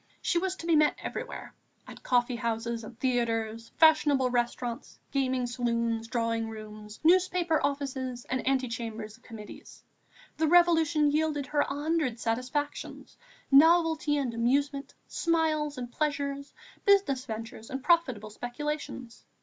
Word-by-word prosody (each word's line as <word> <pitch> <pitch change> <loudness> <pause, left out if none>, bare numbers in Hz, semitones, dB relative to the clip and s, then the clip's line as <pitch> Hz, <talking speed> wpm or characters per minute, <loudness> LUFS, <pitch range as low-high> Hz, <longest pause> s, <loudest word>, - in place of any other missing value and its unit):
She 345 - +1
was 380 +1 -2
to 335 - -9
be 335 -1 +3
met 300 -1 +4
everywhere, - - -6 0.3
at - - -11
coffee 245 -1 +1
houses 230 0 -2
and 230 +2 -11
theatres, 230 -3 -1
fashionable 295 -5 +4
restaurants, 240 0 -2
gaming 260 -2 0
saloons, 235 -1 -1
drawing 230 -1 -1
rooms, 215 -1 -10
newspaper 355 -1 +3
offices 265 -3 -3
and 260 0 -2
ante 265 -1 +2
chambers 225 -2 -6
of - - -29
Committees. 220 -3 -11 0.5
The 320 - +2
Revolution 325 -3 +4
yielded 300 -2 0
her 290 +2 -1
a - - +2
hundred 295 -5 -1
satisfactions, 255 +6 -3 0.4
novelty 320 0 +5
and 265 -5 -1
amusement, 275 +4 0
smiles 310 -3 0
and 245 -1 -6
pleasures, 280 -1 -2 0.3
business 385 -11 +3
ventures 225 -1 -7
and 265 0 -5
profitable 260 - +2
speculations. 255 0 -5
260 Hz, 130 wpm, -29 LUFS, 235-305 Hz, 0.5 s, novelty